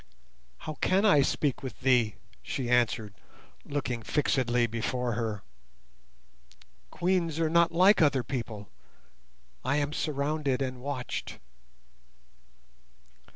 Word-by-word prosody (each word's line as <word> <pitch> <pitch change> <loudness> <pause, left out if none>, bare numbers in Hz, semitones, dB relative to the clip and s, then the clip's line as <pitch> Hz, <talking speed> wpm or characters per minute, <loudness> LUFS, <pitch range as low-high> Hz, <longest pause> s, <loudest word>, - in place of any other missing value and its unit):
"How 155 - -6
can 195 +3 +3
I 170 -9 +6
speak 140 0 0
with 130 -1 -8
thee?" 125 -5 +3 0.3
she 125 -2 -3
answered, 115 -4 +1 0.5
looking 130 -5 -3
fixedly 125 -3 +1
before 120 +2 -2
her; 110 -3 -3 1.5
"Queens 170 - 0
are 160 -1 +1
not 170 0 +4
like 185 +4 +5
other 140 -5 +3
people. 115 -5 -5 1.0
I 140 - +1
am 145 0 0
surrounded 145 -2 -1
and 130 -2 -3
watched." 135 -2 -4
135 Hz, 105 wpm, -29 LUFS, 120-155 Hz, 1.5 s, I